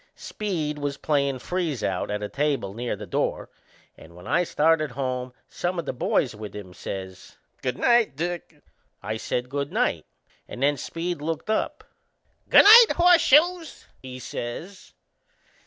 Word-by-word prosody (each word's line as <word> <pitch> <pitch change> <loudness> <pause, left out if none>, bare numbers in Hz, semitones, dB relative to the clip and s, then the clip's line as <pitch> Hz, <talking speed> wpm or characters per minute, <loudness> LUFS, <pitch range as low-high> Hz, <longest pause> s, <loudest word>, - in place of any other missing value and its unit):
Speed 160 -8 -4
was 145 -1 -3
playin' 140 -3 0
freeze 160 -4 -3
out 95 -2 -2
at 105 0 -3
a - - -2
table 140 -7 -1
near 120 +1 -3
the 105 +1 -9
door, - - -2 0.4
and 85 +1 -16
when 90 +1 -13
I 175 - +2
started 155 -2 +2
home 130 -1 -4 0.2
some 175 +1 -3
o' 170 - -2
the 145 - -4
boys 125 0 0
with 105 -1 -9
him 95 -3 -9
says: 95 0 -8 0.2
"Good 125 -1 -2
night, 235 - +3
Dick." 175 +3 -5 0.4
I 110 +2 -3
said 125 +2 -3
good 140 +2 -4
night - - -1 0.4
and 125 - -6
then 145 0 +2
Speed 165 +4 -4
looked 165 +6 -3
up. 220 - -2 0.7
"Good - - +8
night, 455 +2 +9
Horseshoes!"he 335 - +2
says. 130 +9 -7
145 Hz, 150 wpm, -25 LUFS, 120-175 Hz, 0.7 s, night